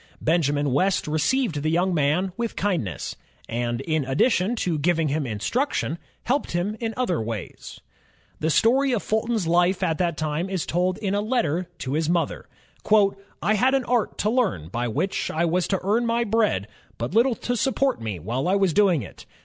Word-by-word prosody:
Benjamin 145 -3 +1
West 185 +6 +1
received 155 - +1
the 155 - 0
young 180 +3 +1
man 165 +5 +1
with 235 -1 -3
kindness, 175 - -2 0.3
and 120 +1 -2
in 155 0 0
addition 180 - +2
to 175 -8 -1
giving 165 0 +1
him 145 -1 -1
instruction, 170 - -1 0.2
helped 275 -4 -1
him 180 +5 -1
in 225 -2 -3
other 185 - 0
ways. 110 -4 -6 0.6
The 160 - 0
story 260 - +3
of 225 - -1
Fulton's 220 -2 0
life 175 +3 +2
at 160 -1 0
that 170 -3 0
time 155 +4 -2
is 190 -4 -2
told 180 +2 0
in 200 -2 -2
a 205 - +1
letter 205 - 0
to 130 - -4
his 155 +1 0
mother. 170 -1 -1 0.4
''I 200 0 +1
had 255 +5 +3
an 270 - +1
art 240 -3 0
to 215 - +3
learn 215 - 0
by 120 +5 -2
which 155 - -1
I 165 +2 0
was 175 +1 +1
to 195 - +1
ROBERT 185 - -4
FULTON 210 +4 +3
35 - - -2
earn - - -1
my 235 +1 +1
bread, 210 - +1 0.3
but 120 +7 -4
little 235 +3 +4
to 245 - -2
support 265 - +1
me 110 -4 -3
while 115 - -2
I 190 - +3
was 195 -4 +2
doing 185 - +3
it. - - -12
180 Hz, 195 wpm, -24 LUFS, 150-220 Hz, 0.6 s, little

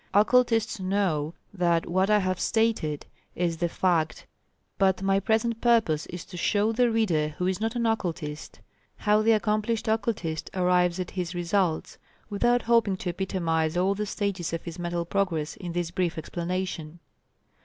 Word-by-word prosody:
Occultists 225 +1 +3
know 185 -5 0 0.2
that 170 -3 +1
what 185 +3 +1
I 210 - +5
have 185 -2 -1
stated 220 -10 0 0.3
is 170 -2 -1
the 170 +1 0
fact, 165 -3 0 0.5
but 190 -1 +2
my 195 0 +3
present 225 +3 0
purpose 220 -11 +2
is 175 0 -7
to 185 - -10
show 205 +4 +2
the 240 +1 +3
reader 165 -10 +1
who 180 - -1
is 190 +2 -1
not 225 +2 -1
an 235 -1 0
Occultist, 170 -9 -3 0.3
how 210 0 +2
the 225 +1 +4
accomplished 215 +1 0
Occultist 205 -7 -1
arrives 180 -1 +2
at 180 - -4
his 180 -1 -4
results, 175 -1 -1 0.3
without 240 +4 +2
hoping 230 -5 +3
to 185 - -4
epitomize 170 -3 -1
all 190 +2 +2
the 210 +1 -3
stages 195 -5 -2
of 165 - -3
his 170 0 -7
mental 175 0 -2
progress 170 -5 -1
in 175 -3 -6
this 175 -1 -2
brief 175 -2 -1
explanation. 170 -1 -4
185 Hz, 160 wpm, -27 LUFS, 170-215 Hz, 0.5 s, I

